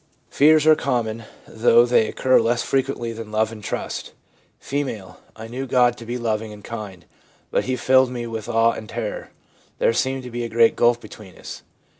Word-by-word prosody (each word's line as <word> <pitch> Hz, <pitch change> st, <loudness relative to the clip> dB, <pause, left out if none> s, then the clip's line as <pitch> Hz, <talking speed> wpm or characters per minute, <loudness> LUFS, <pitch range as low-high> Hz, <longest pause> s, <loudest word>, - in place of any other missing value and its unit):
Fears 155 Hz, +1 st, +5 dB
are 155 Hz, -, +8 dB
common, 115 Hz, -5 st, -2 dB, 0.2 s
though 115 Hz, +1 st, +4 dB
they 120 Hz, -2 st, +3 dB
occur 130 Hz, +3 st, +3 dB
less 120 Hz, +1 st, 0 dB
frequently 135 Hz, -3 st, -1 dB
than 110 Hz, -1 st, -8 dB
love 110 Hz, +1 st, 0 dB
and 110 Hz, -2 st, -10 dB
trust. -, -, -5 dB, 0.5 s
F. -, -, -13 dB, 0.5 s
' -, -, -32 dB
I 110 Hz, 0 st, -9 dB
knew 130 Hz, +4 st, -5 dB
God 125 Hz, -1 st, +3 dB
to 115 Hz, -, -11 dB
be 120 Hz, +1 st, -3 dB
loving 110 Hz, -2 st, -2 dB
and 105 Hz, -1 st, -12 dB
kind, 100 Hz, -7 st, -8 dB, 0.5 s
but -, -, 0 dB
He 130 Hz, -, -1 dB
filled 130 Hz, 0 st, +3 dB
me 120 Hz, -1 st, -5 dB
with 115 Hz, -1 st, -6 dB
awe 115 Hz, 0 st, +3 dB
and 110 Hz, -2 st, -8 dB
terror; 115 Hz, -3 st, -5 dB, 0.5 s
there -, -, +2 dB
seemed 130 Hz, +2 st, -1 dB
to 125 Hz, -, -9 dB
be 120 Hz, 0 st, -4 dB
a 115 Hz, -, -4 dB
great 115 Hz, 0 st, +4 dB
gulf 120 Hz, 0 st, +3 dB
between 105 Hz, -5 st, -13 dB
us.' -, -, -9 dB
115 Hz, 195 wpm, -22 LUFS, 110-125 Hz, 0.5 s, are